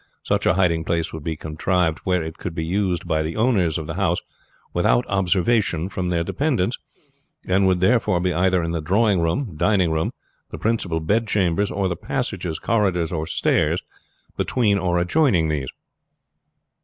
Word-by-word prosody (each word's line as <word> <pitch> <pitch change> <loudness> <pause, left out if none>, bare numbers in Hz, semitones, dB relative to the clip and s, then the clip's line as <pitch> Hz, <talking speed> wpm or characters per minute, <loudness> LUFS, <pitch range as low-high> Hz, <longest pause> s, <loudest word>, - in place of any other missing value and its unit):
Such - - 0
a - - +3
hiding 85 -4 +2
place 85 0 -1
would 80 -2 -7
be 80 0 -2
contrived 80 +2 -1
where 90 -2 +1
it 80 +2 -7
could 90 -3 -5
be 80 -1 -2
used 90 0 -1
by 80 0 +1
the 80 +1 -3
owners 105 -9 +2
of 80 - -5
the 80 - -5
house 90 -1 +1 0.6
without - - +2
observation 95 -1 +1
from 90 -2 -3
their 85 -1 0
dependants, 130 - -1 0.7
and 95 +1 +3
would 90 -1 +2
therefore 105 -3 +3
be 90 0 0
either 90 0 +2
in 85 - -2
the 85 -1 -2
drawing 100 +3 +2
room, 95 - -1
dining 95 0 +2
room, 80 0 0 0.4
the - - -7
principal 95 -8 -1
bed 110 +8 +1
chambers, 100 -1 +1
or 100 -1 -1
the 90 - -2
passages, 80 0 -3
corridors, 95 -7 0
or 80 -2 -3
stairs - - +1 0.5
between 105 -6 +1
or 90 -1 0
adjoining 90 - +2
these." 70 -4 -2
90 Hz, 170 wpm, -22 LUFS, 80-100 Hz, 0.7 s, a